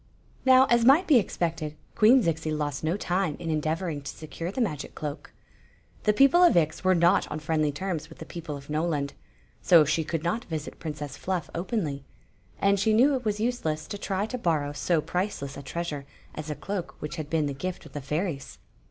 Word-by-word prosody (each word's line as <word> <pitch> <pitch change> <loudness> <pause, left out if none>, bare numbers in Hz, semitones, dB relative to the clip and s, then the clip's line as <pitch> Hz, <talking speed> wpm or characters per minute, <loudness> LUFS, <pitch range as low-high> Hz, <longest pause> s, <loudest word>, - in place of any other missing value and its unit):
Now, 260 0 +8
as 235 -1 +5
might 280 +9 +6
be 295 -7 +6
expected, 165 -6 -2 0.2
Queen 235 +4 +6
Zixi 160 -2 -1
lost 150 -2 -2
no 165 +5 0
time 180 -5 0
in 165 - -5
endeavonng 155 0 -1
to 135 - -5
secure 165 +3 -6
the 230 - -5
magic 155 - -2
cloak. 150 0 -6 0.7
The 210 - +5
people 275 +10 +5
of 350 - +6
Ix 160 +1 +1
were 185 0 +4
not 170 +1 +3
on 150 - -3
friendly 155 -1 0
terms 170 +1 -4
with - - -13
the 160 - -8
peo 170 - -7
ple 150 -3 -5
of 140 - -12
Mpland; 150 -2 -1 0.5
so 165 -3 +6
she 160 +2 +1
could 160 0 -3
not 200 +8 -1
visit 160 -2 -5
Princess 150 -3 -6
Fluff 185 -3 -3
openly; 165 - -2 0.6
and 200 0 +3
she 220 +2 +3
knew 260 +6 +5
it 255 -3 -2
was 210 -1 0
useless 215 -10 -1
to 205 - -4
try 195 0 -1
to 250 +3 -5
borrow 155 -7 0
so 160 +2 +1
priceless 180 -6 -3
a 140 - -7
treasure 145 0 -4 0.3
as 155 0 -6
a 150 - -2
cloak 195 0 -5
which 150 +3 -5
had 155 -2 -5
been 160 -1 +1
the 140 - -2
gift 180 +6 -5
of - - -13
the 145 - -4
fairies. 150 +1 -3
165 Hz, 205 wpm, -27 LUFS, 150-200 Hz, 0.7 s, Now